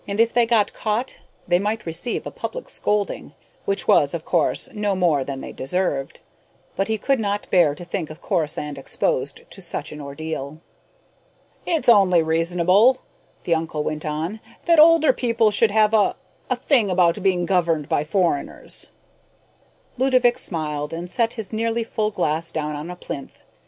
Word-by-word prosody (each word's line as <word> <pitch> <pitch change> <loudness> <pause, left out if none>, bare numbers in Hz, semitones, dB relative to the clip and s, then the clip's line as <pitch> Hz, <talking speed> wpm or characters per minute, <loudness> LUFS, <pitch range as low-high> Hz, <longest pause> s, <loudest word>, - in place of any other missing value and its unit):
If 225 +3 +1
they 235 -1 +3
got 225 -3 +2
caught, 225 +4 -2 0.3
they 175 0 +3
might 215 +2 -2
receive 165 +9 -3
a - - -5
public - - -6
scolding 210 -1 -2 0.3
which 400 -1 -1
was, - - +4
of - - -6
course, - - +1
no 210 -2 -1
more 170 -7 +2
than 135 0 -6
they - - -7
deserved 140 -1 -2 0.5
but 195 - 0
he 220 0 0
could 270 +5 +1
not 205 -1 -2
bear 165 -6 +4
to 175 - -10
think 170 -2 -4
of 155 - -10
Corisande 150 -3 -2
exposed 135 0 -1
to 195 - -12
such 170 -4 -2
an 150 - -8
ordeal. 140 0 -6 1.1
"It's 330 -3 0
only 190 -7 +6
reasonable," 180 +9 +3 0.4
the 170 - +1
uncle 160 -2 -2
went 155 0 -3
on, 160 +7 -3 0.3
"that 335 -2 +5
older 315 -3 +6
people 230 -3 +1
should 215 +2 +3
have 215 +1 +3
a 210 -3 +3 0.3
a 255 - +2
thing 245 -4 +2
about 180 +1 +2
being 185 -2 +1
governed 170 -5 +1
by 145 - +1
foreigners." 165 -2 -1 1.1
Ludovick 255 -2 +3
smiled 150 -3 -3
and 175 +2 -5
set 230 +1 +1
his 220 -2 -7
nearly 230 +1 0
full 215 -1 -1
glass 165 -5 -1
down 150 -1 -3
on 150 +3 -6
a 180 - -6
plinth. 140 -5 -8
185 Hz, 165 wpm, -22 LUFS, 160-225 Hz, 1.1 s, only